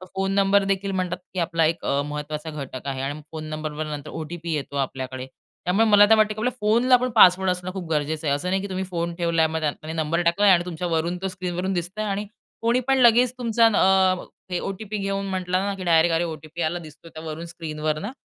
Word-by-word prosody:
Phone 195 0 0
number 200 0 +4
देखील 195 0 -1
म्हणतात, 185 -2 -2 0.2
की 185 - -3
आपला 165 -1 +1
एक 165 +2 -1
अ, 140 - +1
महत्त्वाचा 150 +1 -5
घटक 140 -3 -7
आहे 135 -1 -3
आणि 145 +3 -4
फोन 155 -1 -6
नंबरवर 155 0 -4
नंतर 150 -2 -6
ओ-टी-पी 165 +1 -5
येतो 140 -1 -4
आपल्याकडे. 130 -1 -3 0.4
त्यामुळे 195 +6 +3
मला 205 -1 +7
तर 220 - +8
वाटतं, 215 0 +3
की 215 - -19
आपल्या 245 +3 0
फोनला 230 +5 +3
आपण 250 +1 +1
पासवर्ड 190 -2 +6
असणं 180 0 -2
खूप 185 -4 -6
गरजेचं 155 +1 -1
आहे. 140 - +3
असं 175 +6 -3
नाही, 190 +1 +1
की 200 - -6
तुम्ही 190 0 -2
फोन 170 -2 -3
ठेवलाय 170 -2 +1
आणि 160 - -2
मग 160 - 0
त्यात 155 -1 -3
नंबर 160 +2 0
टाकलाय 195 +4 +4
आणि 175 -1 +4
तुमच्यावरून 170 0 -2
तो 195 - -1
स्क्रीनवरून 185 0 -3
दिसतंय 185 +5 -3
आणि 205 0 -2 0.4
कोणी 235 +2 +2
पण 270 - +3
लगेच 245 0 +5
तुमचा 230 -1 +2
अ, 190 -3 +3 0.3
ते 180 -1 -1
ओ-टी-पी 210 +2 -5
घेऊन 195 0 -2
म्हटलं 185 -1 -1
ना, 200 - -1
की 190 - -7
डायरेक्ट 165 -1 +4
अरे, 165 - +1
ओ-टी-पी 160 0 -6
आला 170 +2 -1
दिसतो 160 0 -13
त्यावरून 160 +1 -7
स्क्रीनवर 155 -2 -3
ना. 205 +8 -5
175 Hz, 220 wpm, -24 LUFS, 155-195 Hz, 0.4 s, तर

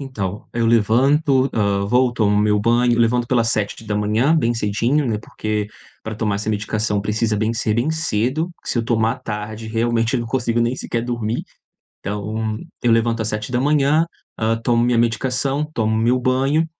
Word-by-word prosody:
Então, 105 -7 -5
eu 115 -1 +1
levanto, 130 +5 +3
hã, 100 -2 +1
vou 125 +3 +3
tomo 105 -3 +2
meu 105 0 +2
banho 120 +1 +2
levanto 120 +1 +2
pelas 115 -3 +2
7:00, 110 +6 0
bem 120 -6 +1
cedinho 115 +7 0
né, 110 -3 -1
porque 105 -1 -3 0.4
pra 110 - -4
tomar 105 -2 -1
essa 105 +2 -4
medicação 105 0 -1
precisa 105 +1 0
bem 110 +2 0
ser 110 -2 -1
bem 125 +7 +1
cedo, 155 +1 -1
que - - -5
se 120 - 0
eu 115 - 0
tomar 115 -1 +1
à 125 - -8
tarde 110 -1 -6
realmente 115 +1 0
eu 125 - +1
não 115 - -4
consigo 120 -1 0
nem 120 +3 0
sequer 115 -1 -3
dormir. 120 -2 -2 0.6
Então, 110 +2 -3 0.3
eu 120 - +3
levanto 115 0 +2
às 110 - -2
7:00, 140 +8 +1 0.3
hã, 110 0 +1
tomo 120 -1 +2
minha 120 -1 +2
medicação, 125 +5 0
tomo 110 -1 0
meu 120 +3 +2
banho, 135 +5 +1
115 Hz, 175 wpm, -20 LUFS, 110-125 Hz, 0.6 s, levanto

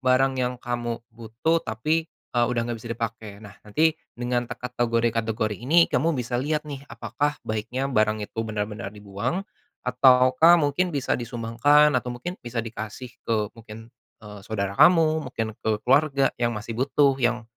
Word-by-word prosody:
barang 130 +1 +2
yang 125 0 -1
kamu 120 -1 -3 0.2
butuh, 115 +9 -1
tapi, 155 +9 -1 0.2
eee, 120 -1 +3
udah 120 -1 0
enggak 115 -2 -4
bisa 120 - -9
dipakai. 115 -2 -5
Nah, 100 -1 -12
nanti 155 +9 +1 0.2
dengan 120 0 -1
terkategori-kategori 115 -3 -1
ini 165 +7 +4
kamu 160 +3 +2
bisa 120 0 -2
lihat 150 +2 -1
nih. 140 -1 -8
Apakah 145 0 -2
baiknya 110 +5 -3
barang 110 -1 +1
itu 115 - -6
benar-benar 105 -1 -4
dibuang? 105 - -3 0.4
Ataukah 130 +5 +5
mungkin 165 +4 0
bisa 140 -3 0
disumbangkan? 120 +5 +3
Atau 125 0 -6
mungkin 175 +10 -6
bisa 120 -1 -4
dikasih? 115 +2 -7 0.2
Ke 110 -2 0
mungkin, 115 0 -12 0.3
eee, 105 -1 -10
saudara 100 -2 -3
kamu, 160 -4 +5
mungkin 115 -2 -2
ke 110 -1 -1
keluarga 140 +1 +3
yang 120 -1 0
masih 110 +2 -6
butuh, 135 +1 +3
yang 120 -1 +1
120 Hz, 155 wpm, -25 LUFS, 110-140 Hz, 0.4 s, Ataukah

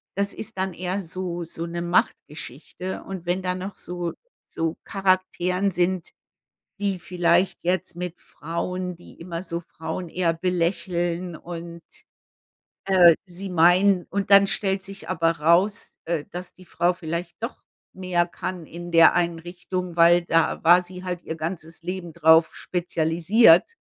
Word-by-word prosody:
das 200 0 -1
ist 200 - -7
dann 190 -1 -1
eher 185 +2 -3
so 175 0 -4
so 165 0 -5
'ne 170 0 -4
Machtgeschichte 175 - -2
und 190 -3 -7
wenn 175 +2 0
dann 180 0 -2
noch 195 +1 -6
so 175 -1 -4 0.3
so 165 0 -3
Charakteren 185 -1 +1
sind, 180 0 0 0.7
die 195 -3 -1
vielleicht 175 +1 +1
jetzt 180 0 -1
mit 180 -1 -5
Frauen 180 +3 -4
die 175 - -15
immer 170 -1 -5
so 170 -1 -4
Frauen 160 +1 -6
eher 170 -1 +1
belächeln 175 0 -1
und, 170 0 -8 1.0
äh, 180 -4 +7
sie 185 +1 -7
meiden. 180 +2 +4
Und 200 0 -2
dann 200 0 +8
stellt 195 -1 -1
sich 195 0 -9
aber 165 0 +2
raus, 180 +7 +2
äh, 165 -3 -2
dass 180 +1 -8
die 185 - -17
Frau 175 +2 +1
vielleicht 170 0 -5
doch 230 +3 -5 0.3
mehr 180 -2 0
kann 175 -1 -6
in 175 +1 -8
der 165 -1 +7
Einrichtung, 175 +1 -3
weil 170 +1 +6
da 165 0 +1
war 175 +2 +7
sie 180 0 -9
halt 180 -1 -4
ihr 160 - -4
ganzes 165 0 -6
Leben 175 -2 -5
drauf 160 0 +5
spezialisiert 170 +2 +3
175 Hz, 145 wpm, -24 LUFS, 170-185 Hz, 1.0 s, dann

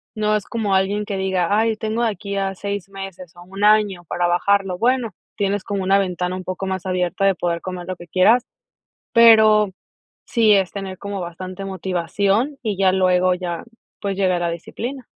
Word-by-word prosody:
No 215 0 +1
es 210 - -1
como 210 -4 -1
alguien 200 +2 +1
que 200 - -4
diga: 190 0 +1
"Ay 225 0 +1
tengo 220 +2 -2
de 230 - +2
aquí 200 0 -5
a 195 -1 -1
6 200 0 -5
meses 195 -3 -9
o 175 - -12
un 195 +3 -7
año 210 -4 +3
para 175 0 0
bajarlo". 190 +1 +1
Bueno, 240 0 +1 0.3
tienes 200 -1 0
como 200 -1 -2
una 195 +1 +3
ventana 180 -1 -2
un 185 - -8
poco 185 +1 -4
más 190 -1 -3
abierta 185 +1 0
de 195 -2 +3
poder 170 0 -1
comer 180 -1 -6
lo 185 - -4
que 175 - -12
quieras, 220 +8 +4 0.7
pero, 220 -3 +6 0.6
sí 225 -3 +3
es 195 -3 +2
tener 195 -2 -6
como 200 -1 -5
bastante 185 +2 -7
motivación 195 - -1
y 215 -3 -1
ya 190 -1 +4
luego 185 -1 +3
ya, 175 -2 -4 0.4
pues, 200 -1 -2
llegara 180 -3 +1
disciplina. 240 +10 -6
195 Hz, 185 wpm, -21 LUFS, 185-210 Hz, 0.7 s, pero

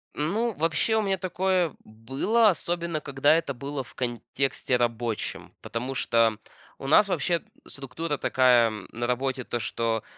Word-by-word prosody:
Ну, 215 +10 0
вообще 165 +7 +1
у 220 - +3
меня 195 -2 0
такое 185 -2 0
было, 135 - +1
особенно 170 -3 -2
когда 140 +2 +3
это 155 -4 -1
было 140 +1 -4
в - - -18
контексте 125 +1 -1
рабочем, 120 -2 -2
потому 125 +3 -4
что 115 -3 +2 0.4
у - - -9
нас 200 +8 +6
вообще 170 0 0 0.2
структура 145 +3 -4
такая 125 -3 +4 0.2
на 120 +1 -3
работе, 130 +1 -1
то, 120 - -3
что, 115 0 -1
135 Hz, 140 wpm, -26 LUFS, 120-170 Hz, 0.4 s, нас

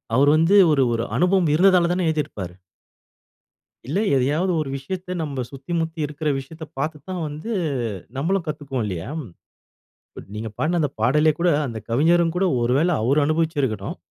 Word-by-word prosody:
அவரு 140 +2 +5
வந்து 165 +6 +4 0.2
ஒரு 135 -3 +3
ஒரு 115 0 -1
அனுபவம் 180 -2 +3
இருந்ததாலதான 180 -1 +4
எழுதிருப்பாரு. 145 - -2 1.3
இல்ல, 170 +9 0 0.2
எதையாவது 150 +8 +1
ஒரு 150 - -2
விஷயத்தை, 180 +7 -5
நாம 140 -5 -3
சுத்தி 135 +4 -10
முத்தி 160 0 -3
இருக்கிற 150 +1 -5
விஷயத்தை 160 +4 -8
பார்த்து 155 +2 -2
தான் 180 -2 -3
வந்து 155 +10 -6 0.7
நம்மளும் 170 +6 0
கத்துக்குவோம் 140 -6 -3
இல்லையா. 90 +3 -4 1.3
நீங்க 110 +1 -4
பாடுன 170 +3 +1
அந்த 145 -3 0
பாடலே 150 +4 +4
கூட, 175 - +3 0.2
அந்த 115 -3 -5
கவிஞரும் 165 +6 +3
கூட 190 - +2 0.2
ஒருவேளை 140 +9 +2
அவர் 135 +6 +2
அனுபவிச்சிருக்கணும். 145 - -1
155 Hz, 140 wpm, -22 LUFS, 135-170 Hz, 1.3 s, அவரு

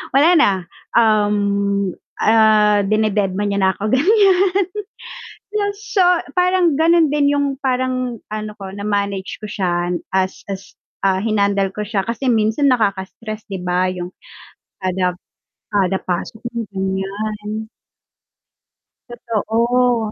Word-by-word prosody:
wala 290 +5 +6
na. 295 -10 +5 0.5
Um, 210 -2 +3 0.8
ah, 215 -2 +4
dine-deadma 205 -1 0
niya 200 0 -1
na 190 - +4
ako 210 +3 -1
ganiyan 385 - +3 0.9
yun 405 -1 +1
so, 420 -3 0 0.3
parang 360 -3 +3
ganun 325 +2 +4
din 285 -1 +3
yung, 285 0 +1 0.2
parang 255 -2 -1
ano 215 0 -4
ko 195 - -7
na 200 - -6
manage 200 -2 -2
ko 215 - -7
siya 175 -3 -1 0.2
as 190 0 -1
as 195 0 -8 0.3
ah, 190 -1 +2
hinandle 200 -2 +1
ko 210 0 -4
siya 205 -2 -1
kasi 235 +4 -4
minsan 220 +5 +1
nakaka-stress 215 -1 -2
'di 195 -3 -5
ba, 180 +1 +1
yung 180 -1 -5 0.7
kada 185 -1 0 0.6
kada 190 -2 +1
pasok 180 +5 -4
mo 235 -1 -3
ganiyan. 210 +3 -3 1.4
Totoo. 235 0 0
215 Hz, 120 wpm, -19 LUFS, 195-250 Hz, 1.4 s, wala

